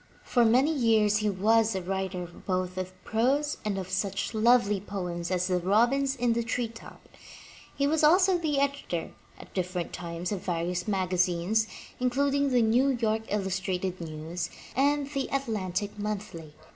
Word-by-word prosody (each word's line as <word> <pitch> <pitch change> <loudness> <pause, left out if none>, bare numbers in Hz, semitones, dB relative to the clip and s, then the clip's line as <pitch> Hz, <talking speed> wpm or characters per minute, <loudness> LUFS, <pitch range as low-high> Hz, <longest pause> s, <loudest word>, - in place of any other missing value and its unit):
For 245 - +2
many 255 +7 +4
years 220 -6 +3
he 215 0 +1
was 215 +2 +2
a 190 - -1
writer 190 -1 -3
both 185 +1 -3
of 185 0 -4
prose 275 +7 +1
and 205 -2 -1
of 190 -2 -4
such 195 +4 -1
lovely 220 -2 +4
poems 180 -4 -4
as 180 -1 0
Robins 235 +10 +2
in 245 -2 +1
the 235 - 0
Treetop, 230 -1 -5 0.7
He 280 - +1
was 310 +2 +1
also 365 +3 +5
the 300 -4 0
editor, 280 -12 -2 0.3
at - - -14
differ 180 -1 -2
ent 175 - -3
times, 170 +1 -4
of 200 -3 -2
various 175 0 -2
magazines, 185 +2 +1 0.3
including 280 +3 +1
the 250 -3 +3
New 240 +5 +3
York 220 -1 -1
Illus 190 -2 0
trated 185 0 -3
News 160 +2 -5 0.3
and 285 +1 +2
the 275 -2 -2
Atlantic 210 -6 -2
Monthly. 200 -7 -5
210 Hz, 155 wpm, -28 LUFS, 185-250 Hz, 0.7 s, also